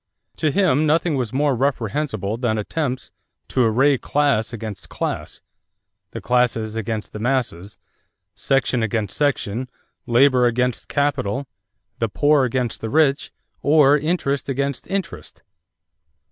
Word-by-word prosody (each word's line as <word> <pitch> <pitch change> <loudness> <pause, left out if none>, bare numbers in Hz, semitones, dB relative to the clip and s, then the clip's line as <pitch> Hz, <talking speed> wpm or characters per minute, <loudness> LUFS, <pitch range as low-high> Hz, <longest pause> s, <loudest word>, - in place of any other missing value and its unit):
To 155 - +1
him 155 -3 +2
nothing 160 +2 +2
was 125 -5 -2
more 140 +1 +1
reprehensible 120 -4 -1
than 115 -2 -1
attempts 130 +3 -3 0.4
"to 130 - +2
array 130 +4 +3
class 140 -7 +1
against 110 -3 -7
class, - - -4 0.7
'the - - -7
classes 115 -3 +1
against 110 -1 -4
the 105 - -6
masses,' 105 -6 -2 0.6
section 135 -2 0
against 110 -3 -1
section, 130 -4 -1 0.4
labor 125 0 +4
against 125 0 -1
capital, 140 -3 -1 0.5
'the 115 - 0
poor 145 +4 +3
against 125 -1 -2
the 110 - -3
rich,' 145 +1 +2 0.3
or 145 -1 +5
interest 145 -3 -1
against 140 0 -2
interest." 190 -2 -5
130 Hz, 120 wpm, -21 LUFS, 115-145 Hz, 0.7 s, or